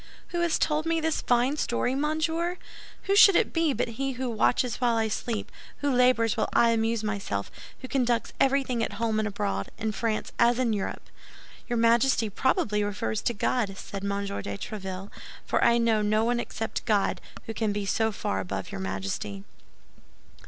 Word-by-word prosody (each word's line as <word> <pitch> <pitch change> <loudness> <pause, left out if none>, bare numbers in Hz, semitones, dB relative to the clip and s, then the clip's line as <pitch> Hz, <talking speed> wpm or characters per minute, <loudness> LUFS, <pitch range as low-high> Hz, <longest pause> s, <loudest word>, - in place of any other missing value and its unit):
"Who 345 - -2
has 340 -2 +2
told 305 +1 0
me 330 0 +1
this 320 -1 0
fine 250 +4 +2
story, 245 -2 0
monsieur? 320 +5 0 0.5
Who 395 - +1
should 400 -2 +8
it - - +2
be 330 -2 +2
but 260 - -1
he 270 -1 -1
who 255 0 -3
watches 235 +2 +1
while 240 -2 +2
I 220 -1 +1
sleep, 220 +1 -3 0.3
who 285 -1 +1
labors 250 -3 +3
while - - 0
I 235 -1 +5
amuse 225 0 0
myself, 200 - -3 0.3
who - - -4
conducts 240 -4 0
everything 265 -3 +2
at - - -3
home 225 -2 0
and 215 - 0
abroad—in 100 - -3
France 220 0 -2
as 235 0 +4
in 245 -3 +1
Europe?" 200 -2 -4 0.6
"Your 240 - 0
Majesty 230 0 +3
probably 210 -3 +1
refers 195 - -2
to 240 - -1
God," 200 -2 0
said 195 0 -7
M. 200 0 -1
de 200 0 -4
Tréville; 195 -2 -6 0.3
"for - - +1
I 235 - +5
know 230 -2 +2
no 215 +1 +2
one 240 0 +1
except 225 -1 -4
God 210 -4 +1 0.2
who 225 - -5
can 220 -1 0
be 205 0 -2
so 220 +3 +1
far 95 - -2
above 95 0 -4
your 95 - -5
Majesty." 95 +1 -4
230 Hz, 180 wpm, -27 LUFS, 205-255 Hz, 0.6 s, should